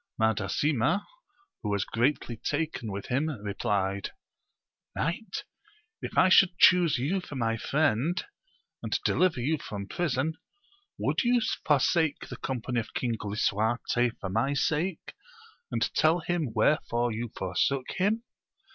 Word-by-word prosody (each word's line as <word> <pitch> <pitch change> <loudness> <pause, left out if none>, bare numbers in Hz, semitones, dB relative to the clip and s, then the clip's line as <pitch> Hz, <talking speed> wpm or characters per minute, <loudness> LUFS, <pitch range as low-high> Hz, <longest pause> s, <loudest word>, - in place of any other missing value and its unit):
Mada 110 -2 +1
sima, 145 - +1 0.6
who 105 - -3
was 100 -1 0
greatly 120 0 0
taken 145 -3 -3
with 100 +1 -6
him, 140 +6 +1
replied. 100 -1 -1 0.9
Knight, 170 +9 -2 0.6
if - - -6
I 185 - +7
should 185 -1 +5
chuse 175 -5 +6
you 160 +10 0
for 150 - -9
my 115 -3 0
friend, 145 +5 +1 0.6
and - - -1
deliver 180 -7 +2
you 150 +5 0
from 100 -5 -6
prison, 160 0 -1 0.6
would - - +1
you 245 0 +3 0.3
forsake 155 +1 +2
the - - -7
company 125 -1 -2
of 115 - -7
King 120 -2 0
Lisuarte 110 +3 0
for 95 - -4
my 135 +8 +1
sake, 160 +5 -1 0.6
and - - 0
tell 165 +2 +3
him 165 -6 -1
wherefore 120 0 +1
you 115 +2 -3
for 90 -1 -4
sook 135 +6 +1
him 210 +5 0
130 Hz, 135 wpm, -28 LUFS, 110-160 Hz, 0.9 s, I